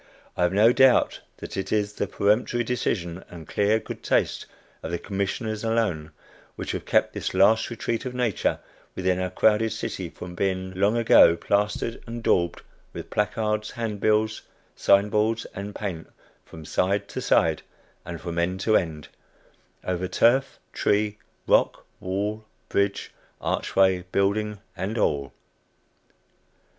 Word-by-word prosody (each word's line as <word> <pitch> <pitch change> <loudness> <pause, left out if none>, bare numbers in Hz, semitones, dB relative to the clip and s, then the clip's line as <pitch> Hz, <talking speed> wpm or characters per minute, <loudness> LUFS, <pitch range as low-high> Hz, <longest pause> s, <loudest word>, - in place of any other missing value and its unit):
I - - -3
have 90 0 +3
no 110 +5 +5
doubt 130 -1 +4 0.2
that - - -8
it 95 - -4
is 105 -1 0
the 100 - -2
peremptory 110 +5 +1
decision 95 -7 -2
and 85 -2 -11
clear 105 +2 +2
good - - -7
taste - - 0 0.3
of - - -5
the 85 - -1
Commissioners 105 +4 -3
alone, 110 -9 0 0.5
which - - -4
have - - -5
kept - - +2
this - - -4
last 105 +4 +4
retreat 115 -1 -3
of 125 - -6
nature 120 -5 0 0.4
within 95 -1 0
our 90 0 -1
crowded 110 +4 +2
city 110 -5 -4
from 90 +1 -9
being 95 0 -2
long 100 +5 +2
ago 95 -7 +6
plastered 105 +5 -1
and 115 0 -6
daubed 85 -1 +1 0.3
with - - -8
placards, 105 0 -1
handbills, 110 -1 0 0.3
sign 100 +1 +4
boards 110 +2 +1
and 100 +1 -6
paint, 90 -6 -5 0.4
from 80 -1 -11
side 100 +5 0
to - - -5
side - - +2 0.4
and 85 -1 -7
from 85 -1 -3
end 90 +2 0
to 110 +1 +2
end, 80 -5 -1 0.8
over 90 0 -2
turf, 125 +8 +2 0.2
tree, 105 0 +1 0.3
rock, - - +2
wall, 105 +4 -3 0.3
bridge, 100 0 0 0.3
archway, 95 -1 +1
building 105 +1 0 0.2
and 105 +5 -3
all. 70 - 0
100 Hz, 140 wpm, -25 LUFS, 95-110 Hz, 0.8 s, ago